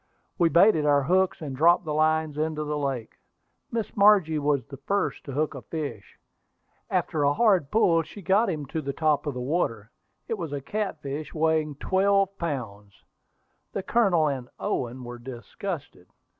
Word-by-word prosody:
We 170 Hz, -1 st, +4 dB
baited 170 Hz, -1 st, +5 dB
our 145 Hz, -1 st, +3 dB
hooks, 185 Hz, +4 st, +1 dB
and 140 Hz, -3 st, -5 dB
dropped 170 Hz, +5 st, +4 dB
the 155 Hz, -, -2 dB
lines 155 Hz, 0 st, +1 dB
into 155 Hz, 0 st, -1 dB
the 150 Hz, 0 st, -3 dB
lake. 135 Hz, -5 st, -3 dB, 0.5 s
Miss 230 Hz, -2 st, -3 dB
Margie 200 Hz, -7 st, +5 dB
was 145 Hz, -2 st, 0 dB
the 135 Hz, -, -10 dB
first 200 Hz, +9 st, -2 dB
to 140 Hz, -, -6 dB
hook 150 Hz, +4 st, -1 dB
a 135 Hz, -, -8 dB
fish. 130 Hz, -5 st, -6 dB, 0.7 s
After 155 Hz, -, 0 dB
a 145 Hz, 0 st, +3 dB
hard 195 Hz, -11 st, +3 dB
pull 170 Hz, -5 st, +3 dB
she 195 Hz, +5 st, -11 dB
got 200 Hz, +5 st, +3 dB
him 155 Hz, -5 st, -3 dB
to 155 Hz, +4 st, -4 dB
the 140 Hz, -1 st, -4 dB
top 150 Hz, 0 st, +1 dB
of 145 Hz, -, -2 dB
the -, -, -4 dB
water. 125 Hz, -, -2 dB, 0.4 s
It 225 Hz, -, -3 dB
was 165 Hz, -4 st, -4 dB
a 145 Hz, -, -2 dB
catfish 155 Hz, -4 st, -4 dB
weighing 155 Hz, -1 st, +1 dB
twelve 195 Hz, +4 st, +2 dB
pounds. 110 Hz, -, -5 dB, 0.7 s
The 195 Hz, -, -3 dB
Colonel 190 Hz, -10 st, +3 dB
and 130 Hz, -4 st, -3 dB
Owen 125 Hz, +1 st, -3 dB
were 120 Hz, 0 st, -8 dB
disgusted. 130 Hz, -, -7 dB
155 Hz, 170 wpm, -26 LUFS, 140-175 Hz, 0.7 s, baited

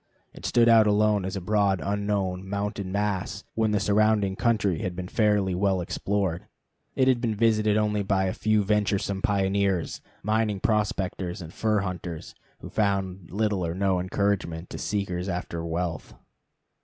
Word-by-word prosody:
It -, -, -6 dB
stood 120 Hz, -1 st, +4 dB
out 115 Hz, -2 st, +6 dB
alone 105 Hz, -1 st, +3 dB
as 95 Hz, -, -3 dB
a 95 Hz, -, -3 dB
broad 100 Hz, 0 st, +2 dB
unknown 100 Hz, -2 st, -2 dB
mountain 100 Hz, -1 st, -3 dB
mass 100 Hz, -1 st, -2 dB
when 110 Hz, -1 st, +1 dB
the 105 Hz, -1 st, +1 dB
surrounding 105 Hz, -1 st, +2 dB
country 105 Hz, -7 st, +1 dB
had 90 Hz, -1 st, -3 dB
been 90 Hz, 0 st, -5 dB
fairly 105 Hz, -3 st, +2 dB
well 95 Hz, +1 st, +1 dB
explored. 90 Hz, 0 st, -2 dB, 0.5 s
It 130 Hz, -, +3 dB
had 125 Hz, -2 st, +3 dB
been 115 Hz, -3 st, 0 dB
visited 110 Hz, -1 st, +3 dB
only 105 Hz, -1 st, +1 dB
by 95 Hz, -1 st, +1 dB
a 95 Hz, -, -1 dB
few 110 Hz, -1 st, +1 dB
venturesome 100 Hz, -1 st, 0 dB
pioneers, 100 Hz, -3 st, 0 dB, 0.2 s
mining 110 Hz, -1 st, +1 dB
prospectors, 95 Hz, -4 st, -1 dB
and 80 Hz, -2 st, -9 dB
fur 110 Hz, -2 st, +1 dB
hunters, 90 Hz, -4 st, -5 dB, 0.3 s
who -, -, -8 dB
found 95 Hz, -4 st, -1 dB
little 105 Hz, -1 st, 0 dB
or 85 Hz, 0 st, -2 dB
no 95 Hz, -1 st, +1 dB
encouragement 90 Hz, -2 st, -1 dB
to -, -, -6 dB
seekers 95 Hz, -3 st, -2 dB
after 85 Hz, -2 st, -4 dB
wealth. 85 Hz, -1 st, -3 dB
100 Hz, 155 wpm, -26 LUFS, 95-105 Hz, 0.5 s, out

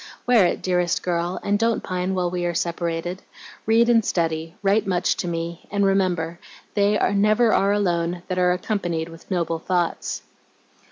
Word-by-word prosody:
Wear 235 Hz, -7 st, +5 dB
it, -, -, -3 dB
dearest 180 Hz, -1 st, +1 dB
girl, 175 Hz, 0 st, -1 dB
and 205 Hz, 0 st, +1 dB
don't 230 Hz, 0 st, +1 dB
pine 185 Hz, +1 st, -2 dB
while 180 Hz, -1 st, 0 dB
we 180 Hz, -1 st, -2 dB
are 175 Hz, -1 st, -1 dB
separated. 170 Hz, +1 st, -2 dB, 0.5 s
Read 230 Hz, +1 st, +4 dB
and 230 Hz, -2 st, +4 dB
study, 165 Hz, -2 st, -1 dB
write 200 Hz, +2 st, +2 dB
much 180 Hz, -2 st, +1 dB
to -, -, -3 dB
me, 170 Hz, 0 st, -4 dB
and 200 Hz, 0 st, +1 dB
remember, 180 Hz, -4 st, 0 dB, 0.3 s
"They 205 Hz, 0 st, +2 dB, 0.2 s
never 215 Hz, +3 st, +3 dB
are 200 Hz, +1 st, +3 dB
alone 175 Hz, -3 st, 0 dB
that 185 Hz, -1 st, -2 dB
are 180 Hz, 0 st, +4 dB
accompanied 175 Hz, -4 st, -2 dB
with 165 Hz, 0 st, -14 dB
noble 170 Hz, -3 st, -1 dB
thoughts."'" 175 Hz, 0 st, -2 dB
180 Hz, 165 wpm, -23 LUFS, 170-200 Hz, 0.5 s, Wear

